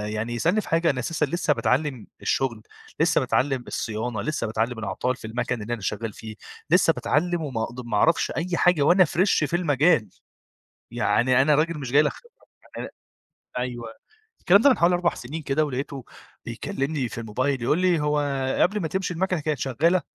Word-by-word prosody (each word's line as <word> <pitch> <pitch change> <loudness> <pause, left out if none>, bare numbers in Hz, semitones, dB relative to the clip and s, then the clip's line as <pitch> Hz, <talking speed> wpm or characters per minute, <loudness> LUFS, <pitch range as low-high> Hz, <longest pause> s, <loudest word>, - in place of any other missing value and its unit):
يعني 115 +3 -3
يسألني 175 - +1
في - - -11
حاجة 165 0 +2
أنا 130 - 0
أساسًا 150 +4 -1
لسه 155 +1 0
باتعلّم 130 0 -1
الشغل، 120 -5 -1 0.4
لسه - - +3
باتعلّم 135 -2 0
الصيانة، 110 0 -3
لسه 155 -4 -2
باتعلّم 115 +2 -2
الأعطال 110 +5 -2
في 110 - -9
المَكَن 120 +1 -3
اللي 110 +3 -4
أنا 115 - -5
شغّال 105 +2 -3
فيه، 110 +1 -9 0.3
لسه 170 -1 +4
باتعلّم 175 +3 0
وما 130 -7 -3
اقد 120 +2 -6
ما 110 -3 -1
أعرفش 165 +10 +2
أي 175 +1 -2
حاجة 180 -3 +3
وأنا 180 +6 +5
Fresh 170 0 +2
في 165 - -2
المجال، 155 - +2 0.8
يعني 130 +1 +2
أنا 150 +2 +4
راجل 155 +1 +1
مش 130 -4 -6
جاي 145 +2 +6
لك 150 - 0
خِبرة، 475 0 -20 0.3
أنا - - -5 0.7
أيوه 125 -1 -4 0.5
الكلام 195 +3 +5
ده 285 - +7
من 250 - +2
حوالي 175 +1 +4
4 175 -1 +1
سنين 150 +7 -7
كده، 145 +2 +1
ولقيته 135 -1 -5 0.4
بيكلّمني 135 +3 -3
في - - -8
الموبايل 130 +4 -2
يقول 140 +7 +2
لي: 180 -3 +2
"هو 150 0 +1 0.4
قبل 210 +3 +2
ما 165 - -2
تمشي 190 +2 -2
المَكَنة 185 0 -1
كانت 150 -1 -2
شغّالة؟" 160 +9 +1
145 Hz, 185 wpm, -24 LUFS, 120-165 Hz, 0.8 s, ده